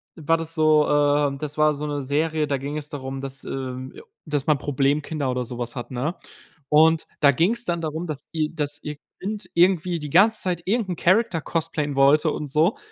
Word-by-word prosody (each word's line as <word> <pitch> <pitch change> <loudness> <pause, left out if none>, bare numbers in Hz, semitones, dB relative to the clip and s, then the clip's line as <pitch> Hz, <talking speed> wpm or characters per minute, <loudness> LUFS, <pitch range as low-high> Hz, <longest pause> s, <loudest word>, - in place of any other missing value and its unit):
war 165 0 +1
das 165 0 -5
so, 155 -1 +4
äh 145 -1 +2
das 150 +1 -5
war 155 0 +4
so 145 +1 -5
'ne 145 -2 -3
Serie, 155 +2 0
da 140 - 0
ging 140 +3 -5
es 150 -1 -7
darum, 135 -2 -5
dass, 135 0 -7
ähm 130 0 -5 0.3
dass 150 -1 -2
man 155 -3 +3
Problemkinder 145 +1 0
oder 125 -1 -2
so 120 - -7
was 120 -1 -5
hat, 120 0 -6
ne? 135 +8 -2 0.5
Und 160 +1 +5 0.2
da 140 -2 +7
ging's 215 - +1
dann 170 -1 -1
darum, 160 +2 -3
dass 150 -3 -5
ihr 155 -2 -1
dass 145 -2 -3
ihr 150 -1 -5 0.2
Kind 210 +2 -5
irgendwie 175 -1 +3
die 150 -1 -6
ganze 215 +7 +4
Zeit 180 -3 -2
irgendeinen 200 -3 0
Character 185 -2 +2
cosplayen 150 -3 -2
wollte 145 +3 +4
und 150 - -4
so. 155 - +2
150 Hz, 200 wpm, -23 LUFS, 140-165 Hz, 0.5 s, da